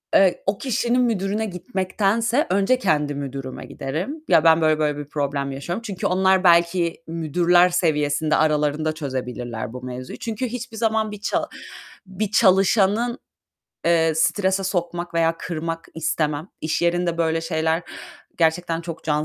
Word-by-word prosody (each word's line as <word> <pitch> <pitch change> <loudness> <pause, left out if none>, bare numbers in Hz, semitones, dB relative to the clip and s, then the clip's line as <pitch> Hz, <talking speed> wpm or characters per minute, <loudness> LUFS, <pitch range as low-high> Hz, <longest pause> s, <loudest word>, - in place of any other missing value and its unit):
eee, 190 -2 +4
o 195 +1 +1
kişinin 245 +1 0
müdürüne 215 -2 0
gitmektense 210 - 0
önce 200 +7 +2
kendi 150 - +1
müdürüme 135 -2 -6
giderim. 180 - -5
"Ya, 155 - +5
ben 165 0 +5
böyle 155 -1 +3
böyle 150 -1 0
bir 145 - -5
problem 140 -1 -2
yaşıyorum." 170 +10 -4
Çünkü 195 -5 -3
onlar 190 0 +3
belki 170 -1 +3
müdürler 170 +2 +3
seviyesinde 155 -3 +1
aralarında 155 0 +1
çözebilirler 125 -5 -5
bu 125 - -7
mevzuyu. 125 0 -7
Çünkü 230 +2 -3
hiçbir 240 -1 -6
zaman 220 -1 0
bir 210 -1 -9
ça - - -1 0.6
bir 195 +2 -3
çalışanı, 205 +4 +3 0.7
eee, 165 -1 +3
strese 190 +3 +1
sokmak 175 -2 -3
veya 165 0 +2
kırmak 165 -1 -4
istemem. 155 0 -1
İş 155 +1 -1
yerinde 170 0 +1
böyle 165 0 +1
şeyler 160 0 0 0.6
gerçekten 165 0 +1
çok 165 -1 -7
can 150 -1 0
170 Hz, 140 wpm, -22 LUFS, 155-195 Hz, 0.7 s, Ya